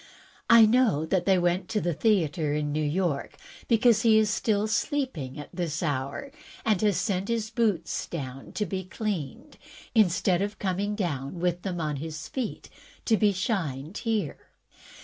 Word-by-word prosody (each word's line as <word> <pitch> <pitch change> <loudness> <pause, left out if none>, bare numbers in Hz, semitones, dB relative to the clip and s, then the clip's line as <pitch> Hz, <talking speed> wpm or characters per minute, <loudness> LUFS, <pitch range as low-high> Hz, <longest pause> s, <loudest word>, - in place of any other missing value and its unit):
I 230 -1 +9
know 215 - +3
that 175 +2 0
they 190 -1 +4
went 175 +1 0
to 215 - 0
the 175 -3 -1
theatre 160 -7 +1
in 150 -1 -1
New 155 +1 0
York, 150 -1 -1 0.3
because 230 -1 +4
he 225 -2 +5
is 215 -1 +3
still 210 -1 +1
sleeping 220 - -2
at 145 - -9
this 170 -2 -2
hour, 145 - -3 0.3
and 215 -5 +2
has 205 -5 +2
sent 185 +1 -1
his 225 -2 -1
boots 210 -8 0
down 135 -5 -6
to 210 - -1
be 190 -1 -3
cleaned, 185 -6 -5 0.3
instead 185 -4 +3
of 205 +1 -2
coming 200 +2 -1
down 160 -5 -3
with 175 0 0
them 180 -2 -3
on 150 -3 -2
his 155 +1 -6
feet 255 -5 -4 0.4
to 225 - +4
be 210 0 +3
shined 180 - -2
here. 225 -3 -2
185 Hz, 165 wpm, -27 LUFS, 155-215 Hz, 0.4 s, I